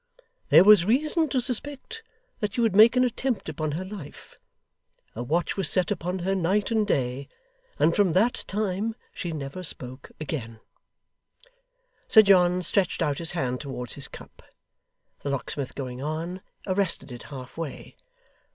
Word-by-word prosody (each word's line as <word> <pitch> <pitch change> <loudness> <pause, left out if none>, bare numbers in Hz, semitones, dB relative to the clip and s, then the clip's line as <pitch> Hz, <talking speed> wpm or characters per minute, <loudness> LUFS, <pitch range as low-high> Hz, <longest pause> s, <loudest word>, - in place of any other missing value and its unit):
There - - +8
was 210 -3 +8
reason 300 - +1
to 260 - +1
suspect 280 - -2 0.4
that 210 -3 -2
she 240 - +1
would 225 -5 +2
make 220 +4 +8
an 250 - +4
attempt 250 0 -1
upon 155 -2 -3
her 180 +5 -3
life. 185 -7 -10 0.8
A 115 - -4
watch 160 +8 0
was 195 -4 +1
set 185 +2 +2
upon 180 -1 -2
her 195 - +1
night 195 +4 +1
and 220 -2 +2
day; 130 +1 -1 0.5
and 165 - +3
from 195 -5 +3
that 220 +8 +2
time 210 +2 -2 0.2
she 175 - -4
never 145 +2 -5
spoke 130 -6 -7
again 125 -8 -5 0.7
' - - -34
Sir 220 - +8
John 180 -2 +4
stretched 185 0 +1
out 145 -3 -1
his 165 0 -3
hand 125 -7 -1
towards 125 -4 -6
his - - -6
cup. - - -13 0.8
The 145 - -4
locksmith 140 0 -3
going 130 -2 -5
on, 165 +5 -4 0.2
arrested 190 -7 0
it 120 - -8
half 130 -3 -9
way. 165 -4 -7
185 Hz, 160 wpm, -26 LUFS, 145-220 Hz, 0.8 s, There